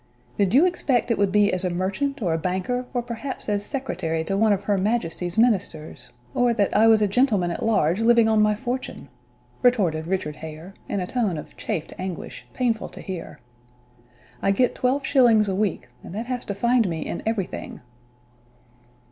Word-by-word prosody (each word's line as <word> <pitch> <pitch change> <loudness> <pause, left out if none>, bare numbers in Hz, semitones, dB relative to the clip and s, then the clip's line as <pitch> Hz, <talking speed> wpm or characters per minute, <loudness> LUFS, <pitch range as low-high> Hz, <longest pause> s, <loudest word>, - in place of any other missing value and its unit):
"Did 200 +1 +1
you 300 +6 +7
expect 275 -9 +1
it 230 - 0
would 200 -2 +2
be 205 0 +3
as 185 0 0
a 180 - +1
merchant, 200 +10 -2
or 170 -4 +1
a - - +1
banker, 190 +9 -2
or 245 -2 -1
perhaps 240 +3 -6
as 205 -1 0
secretary 165 - -2
to 195 +4 -2
one 215 +2 +3
of 200 -1 +1
her 205 0 +1
majesty's 185 -3 -1
ministers 195 -9 0 0.2
or 245 -1 +2
that 205 -3 +1
I 220 +2 +6
was 220 -1 +5
a - - +3
gentleman 205 -5 +2
at - - -5
large, 200 -5 +2
living 230 0 +5
on 220 -1 +3
my 210 0 +3
fortune?" 245 - -5 0.5
retorted 180 -11 +2
Richard 175 -5 -2
Hare, 160 +4 -9 0.2
in 200 - -1
a - - -2
tone 210 -5 -1
of 150 - -9
chafed 155 - -4
anguish, 185 -2 -6
painful 235 -4 -1
to - - -12
hear. 180 -9 -7 1.0
"I - - +1
get 240 +6 +2
twelve 265 +2 0
shillings 235 -6 +4
a 195 - -1
week, 190 -9 -1 0.2
and 180 - -9
that 225 +3 -3
has 250 0 -4
to 200 - -4
find 235 0 +2
me 160 -2 -3
in - - -4
everything!" 215 -5 -3
210 Hz, 190 wpm, -24 LUFS, 185-240 Hz, 1.0 s, you